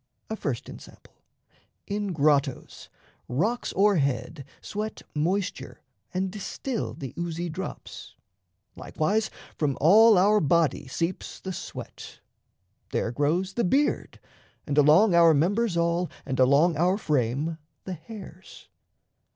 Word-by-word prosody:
A - - -1
first 140 - -4
ensample: - - -13 0.7
in 205 -1 -3
grottos, 145 -4 0 0.4
rocks 210 - -1
o'erhead 145 - +1
Sweat 215 +1 -5
moisture 180 +6 -2 0.3
and 185 +1 -2
distil 220 +5 -4
the 135 -3 -7
oozy 170 0 -3
drops; 180 +4 -8 0.6
Likewise, 210 +8 -1 0.3
from 145 -4 0
all 215 +7 +7
our 205 +3 +4
body 160 -3 +1
seeps 165 +8 -4
the 190 - -5
sweat; - - -9 0.7
There 115 - -1
grows 160 +9 0
the 235 - 0
beard, 275 +11 0 0.5
and 145 - -2
along 155 +8 +5
our 170 -2 +6
members 190 +5 +1
all 170 +1 +1 0.2
And 130 - -3
along 140 +5 +4
our 180 +4 +2
frame 150 - -1 0.2
the 185 - -5
hairs. 185 +1 -12
170 Hz, 115 wpm, -26 LUFS, 150-200 Hz, 0.7 s, all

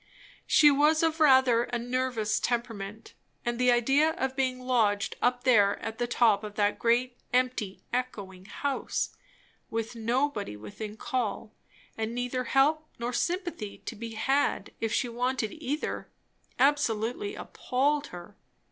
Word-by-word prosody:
She 295 -1 +7
was 300 +3 +3
of 325 0 +1
rather 260 -5 +5
a 245 - -3
nervous 240 -3 -1
temperament; 225 -3 -3 0.3
and 240 0 -1
the 250 0 +4
idea 275 +6 +3
of 265 0 -2
being 260 -1 0
lodged 225 -5 +1
up 245 0 +1
there 210 -6 +4
at 225 +1 -6
the 240 - 0
top 225 -4 +3
of 210 -1 -7
that 205 -1 +1
great, 240 +1 +1
empty, 250 -6 0
echoing 200 -7 -4
house, 280 +6 -2 0.5
with 225 +1 -3
nobody 230 - -1
within 205 - -8
call, 225 -2 -3 0.5
and 225 +1 -2
neither 250 +1 -2
help 300 +5 +2
nor 235 +1 -3
sympathy 345 - -2
to 235 - -5
be 225 +1 -7
had 270 -2 0
if 225 -1 -1
she 245 - +1
wanted 245 -2 -1
either, 300 0 -4 0.5
absolutely 275 - +1
appalled 285 +3 -1
her. 180 +3 -11
245 Hz, 140 wpm, -28 LUFS, 220-265 Hz, 0.5 s, She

